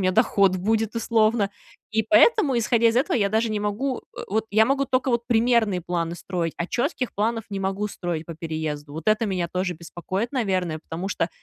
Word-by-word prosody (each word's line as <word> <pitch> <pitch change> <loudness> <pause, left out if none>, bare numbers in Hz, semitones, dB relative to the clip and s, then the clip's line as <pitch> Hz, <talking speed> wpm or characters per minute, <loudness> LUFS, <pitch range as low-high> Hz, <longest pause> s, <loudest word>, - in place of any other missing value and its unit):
меня 185 - +3
доход 195 -3 +3
будет, 220 +3 0
условно, 220 -2 +2 0.4
и 220 - +2
поэтому, 320 - +4
исходя 230 0 +3
из 230 - 0
этого, 255 0 +2
я 200 -3 +2
даже 220 +2 +1
не 210 -1 -2
могу, 230 +6 -1 0.2
э, - - -3
вот, 220 +3 0
я 215 +2 +5
могу 275 +3 +1
тока 260 0 0
вот 235 0 -1
примерные 225 -5 +3
планы 170 -1 -2
строить, 175 -4 -3
а 175 - -2
четких 250 - -2
планов 225 +2 -1
не 195 -1 -3
могу 195 +2 -1
строить 175 -5 -4
по 165 - -7
переезду. 155 -3 -4
Вот 160 +3 -7
это 215 +1 +3
меня 185 -4 -1
тоже 180 +1 -2
беспокоит, 185 - -4
наверное, 185 - -1
потому 165 +4 -6
что - - -1
210 Hz, 200 wpm, -24 LUFS, 180-230 Hz, 0.4 s, я